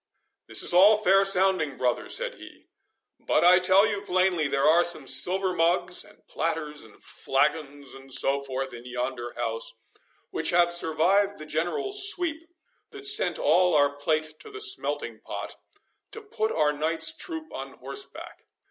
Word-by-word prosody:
"This -, -, +1 dB
is -, -, +3 dB
all 200 Hz, +4 st, +7 dB
fair 195 Hz, -2 st, +4 dB
sounding, 190 Hz, -7 st, +2 dB
brother," 125 Hz, -1 st, -1 dB
said -, -, -2 dB
he; -, -, -14 dB, 0.5 s
"but -, -, +1 dB
I 180 Hz, +1 st, +7 dB
tell 185 Hz, +2 st, +4 dB
you 205 Hz, -2 st, -2 dB
plainly 180 Hz, -5 st, +1 dB
there 140 Hz, 0 st, -1 dB
are 170 Hz, +2 st, +5 dB
some 175 Hz, -1 st, -1 dB
silver 185 Hz, +1 st, +2 dB
mugs, 175 Hz, +2 st, 0 dB
and 210 Hz, 0 st, -20 dB
platters, 155 Hz, -2 st, -3 dB
and 110 Hz, -2 st, -14 dB
flagons, 145 Hz, 0 st, -1 dB
and 135 Hz, 0 st, -12 dB
so 135 Hz, +1 st, +2 dB
forth, 135 Hz, -1 st, -5 dB
in 120 Hz, 0 st, -10 dB
yonder 125 Hz, -1 st, -4 dB
house, 115 Hz, -1 st, -4 dB, 0.6 s
which -, -, +1 dB
have 175 Hz, 0 st, +3 dB
survived 185 Hz, +5 st, +1 dB
the 155 Hz, -, -9 dB
general 165 Hz, -, -2 dB
sweep 355 Hz, -5 st, -1 dB, 0.4 s
that 405 Hz, -1 st, -10 dB
sent 425 Hz, +4 st, +4 dB
all 180 Hz, -, +3 dB
our 145 Hz, -1 st, +4 dB
plate 155 Hz, +2 st, -2 dB
to -, -, -11 dB
the 420 Hz, 0 st, -9 dB
smelting 405 Hz, -2 st, -1 dB
pot, -, -, -7 dB, 0.6 s
to 445 Hz, -, -5 dB
put 220 Hz, -, -2 dB
our 150 Hz, -2 st, +1 dB
knight's 160 Hz, +2 st, -1 dB
troop 320 Hz, -2 st, -8 dB
on -, -, -7 dB
horseback. 410 Hz, -, -9 dB
175 Hz, 160 wpm, -26 LUFS, 145-200 Hz, 0.6 s, all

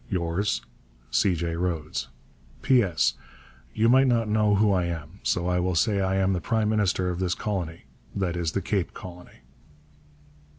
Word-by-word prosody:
Yours, 90 Hz, +1 st, -1 dB, 0.5 s
C. 95 Hz, -3 st, +2 dB
J. 85 Hz, 0 st, -2 dB
RHODES. 80 Hz, -7 st, -2 dB, 0.6 s
PS. 105 Hz, -11 st, +3 dB, 0.6 s
You 110 Hz, -, +3 dB
might 130 Hz, +3 st, +5 dB
not 115 Hz, -3 st, +2 dB
know 105 Hz, -1 st, +3 dB
who 105 Hz, +1 st, +3 dB
I 90 Hz, -2 st, +1 dB
am, 85 Hz, +2 st, -6 dB
so 85 Hz, 0 st, 0 dB
I 90 Hz, 0 st, +1 dB
will 90 Hz, 0 st, 0 dB
say 100 Hz, +4 st, +2 dB
I 95 Hz, 0 st, 0 dB
am 95 Hz, 0 st, +2 dB
the 90 Hz, -, -2 dB
Prime 110 Hz, +4 st, 0 dB
Minister 95 Hz, -4 st, +1 dB
of 90 Hz, -, -4 dB
this 90 Hz, -1 st, 0 dB
Colony 90 Hz, -7 st, -4 dB, 0.3 s
that 95 Hz, -3 st, -1 dB
is 85 Hz, -2 st, -2 dB
the 100 Hz, -, -1 dB
Cape 95 Hz, -3 st, -1 dB
Colony. 90 Hz, -1 st, -11 dB
95 Hz, 165 wpm, -26 LUFS, 85-105 Hz, 0.6 s, might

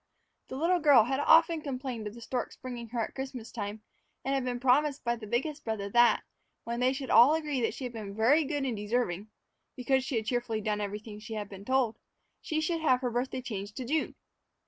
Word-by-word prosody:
The -, -, -7 dB
little 340 Hz, +6 st, +2 dB
girl 285 Hz, -7 st, +7 dB
had 265 Hz, +4 st, -1 dB
often 325 Hz, +2 st, +5 dB
complained 255 Hz, -6 st, -4 dB
of 210 Hz, -, -8 dB
the 235 Hz, -, -11 dB
stork's 245 Hz, +2 st, -3 dB
bringing 245 Hz, -2 st, -7 dB
her 235 Hz, +1 st, -2 dB
at -, -, -3 dB
Christmas 265 Hz, -4 st, -6 dB
time, 210 Hz, -1 st, -5 dB, 0.4 s
and 270 Hz, -, 0 dB
had 270 Hz, -1 st, +1 dB
been 245 Hz, -1 st, -2 dB
promised 275 Hz, +3 st, +2 dB
by 235 Hz, 0 st, +1 dB
the 220 Hz, -2 st, -9 dB
biggest 285 Hz, +7 st, -2 dB
brother 215 Hz, -3 st, -3 dB
that, 240 Hz, +3 st, +4 dB, 0.4 s
when 235 Hz, 0 st, -3 dB
they 250 Hz, +1 st, +3 dB
should 270 Hz, -1 st, -4 dB
all 270 Hz, +6 st, +7 dB
agree 300 Hz, -5 st, -2 dB
that 225 Hz, -, 0 dB
she 260 Hz, -, -4 dB
was 215 Hz, -4 st, -7 dB
very 255 Hz, +9 st, +4 dB
good 290 Hz, -1 st, -2 dB
and 250 Hz, -4 st, -1 dB
deserving 210 Hz, -2 st, -1 dB, 0.5 s
because 265 Hz, +1 st, +1 dB
she 265 Hz, -, -3 dB
had 220 Hz, -1 st, -1 dB
cheerfully 240 Hz, -2 st, -1 dB
done 210 Hz, 0 st, -1 dB
everything 210 Hz, +1 st, -5 dB
she 220 Hz, +1 st, -7 dB
had 205 Hz, -1 st, -4 dB
been 195 Hz, 0 st, -10 dB
told 260 Hz, -3 st, +1 dB, 0.4 s
she 310 Hz, 0 st, -1 dB
should 330 Hz, +1 st, -1 dB
have 260 Hz, -5 st, +3 dB
her 250 Hz, -2 st, -1 dB
birthday 255 Hz, +2 st, -2 dB
changed 205 Hz, -4 st, -6 dB
to 255 Hz, -, -4 dB
June! 305 Hz, +5 st, -1 dB
245 Hz, 215 wpm, -30 LUFS, 220-270 Hz, 0.5 s, girl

